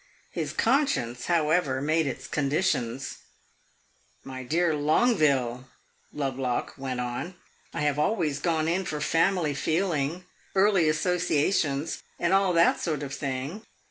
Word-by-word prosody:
His - - -3
conscience, 230 - +1
however, 155 -5 +2
made 155 +2 +1
its 130 0 -5
conditions. 135 -3 -1 1.1
"My 130 -1 -7
dear 160 +5 +1
Longueville," 145 - +2 0.4
Lovelock 135 -3 -2
went 130 -2 -4
on, 125 +9 -4 0.4
"I - - -4
have 145 -1 +1
always 155 -5 +1
gone 160 0 0
in 180 +3 +1
for 155 -4 -4
family 165 0 +2
feeling, 165 +1 -1 0.3
early 190 -4 +4
associations, 155 -2 0 0.2
and 175 +2 +1
all 195 -1 +4
that 170 0 +4
sort 150 -3 -2
of 135 -1 -5
thing. 140 +7 -4
150 Hz, 120 wpm, -27 LUFS, 135-175 Hz, 1.1 s, early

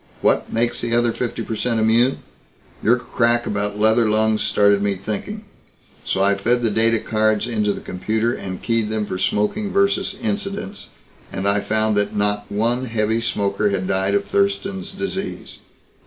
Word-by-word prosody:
What - - +1
makes 120 +1 0
the 120 0 0
other 120 0 +2
fifty 120 +1 -3
per 110 - -4
cent 115 0 0
immune? 115 +4 +2 0.6
Your 120 +3 +4
crack 120 0 +1
about 105 0 -2
leather 110 +1 +3
lungs 110 0 +2
started 100 -1 +3
me 100 -1 0
thinking 110 - -5 0.6
so 95 - 0
I 100 +1 +4
fed 120 +5 0
the 115 - +2
data 115 +2 +3
cards 110 -1 +1
into 105 -3 0
the - - -5
computer 110 +5 -1
and 95 -1 -6
keyed 115 -2 0
them 110 -1 -1
for 95 - -4
smoking 105 - 0
versus 200 0 +1
incidence. 205 -2 -4 0.4
And 95 +1 -2
I 100 +1 +3
found 110 +1 +1
that 105 - 0
not 105 0 -1
one 120 +5 0
heavy 110 -1 0
smoker 100 -2 0
had 95 -2 -1
died 95 +1 +1
of 100 0 +1
Thurston's 100 -1 -1
Disease. - - -5
110 Hz, 170 wpm, -21 LUFS, 100-120 Hz, 0.6 s, Your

